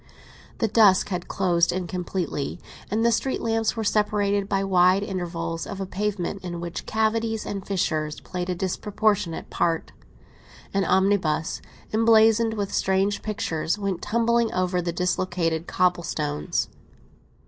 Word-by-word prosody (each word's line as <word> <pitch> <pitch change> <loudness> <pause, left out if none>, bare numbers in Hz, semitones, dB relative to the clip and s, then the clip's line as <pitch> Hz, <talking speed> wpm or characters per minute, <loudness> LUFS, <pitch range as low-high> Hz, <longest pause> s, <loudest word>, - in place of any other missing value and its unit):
The 225 - +1
dusk 210 -4 +5
had 180 -2 -3
closed 175 -3 +2
in 185 0 -2
completely 175 -5 -3 0.3
and 220 +3 +1
the 235 - +5
street 260 +3 0
lamps 225 0 0
were 225 - -1
separated 205 -1 +1
by 195 -1 +1
wide 185 0 +4
intervals 170 -4 -3
of 195 - -6
a 195 - -2
pavement 195 -1 -3
in 175 -1 -5
which 175 0 -6
cavities 220 0 0
and 200 -1 -4
fissures 155 -6 -1
played 180 0 -5
a 180 - 0
disproportionate 195 0 -1
part. 165 -1 0 0.8
An 195 -1 +1
omnibus, 190 -5 +1 0.3
emblazoned 225 0 +4
with 200 -2 -3
strange 195 +2 +1
pictures, 170 -5 -2
went 195 -4 -2
tumbling 235 +1 +1
over 180 0 +1
the 175 0 -2
dislocated 175 -2 -1
cobble 180 -1 +2
stones. 150 - -2
190 Hz, 135 wpm, -25 LUFS, 175-210 Hz, 0.8 s, dusk